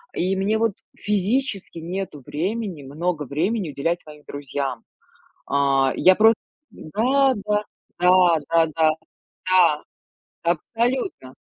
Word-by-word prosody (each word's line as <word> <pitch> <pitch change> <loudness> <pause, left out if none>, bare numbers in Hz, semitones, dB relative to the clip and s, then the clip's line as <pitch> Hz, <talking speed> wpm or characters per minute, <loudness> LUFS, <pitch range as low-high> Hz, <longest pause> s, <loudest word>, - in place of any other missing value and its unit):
и 185 +2 0
мне 205 +3 +1
вот 225 -2 +1 0.2
физически 205 -2 -1
нету 175 -3 -5
времени, 185 -1 -3
много 155 +3 -2
времени 170 - -1
уделять 165 +5 -1
своим 150 -1 -14
друзьям. 140 -3 -4 0.6
А, 135 -1 +2
я 185 0 +6
про 220 +1 +6 0.4
Да, 260 - +1
да, 210 0 +1 0.4
да, 180 -2 +5
да-да, 160 -1 +3 0.6
да, 180 -5 +4 0.6
абсолютно. 225 - -1
175 Hz, 105 wpm, -23 LUFS, 150-210 Hz, 0.6 s, я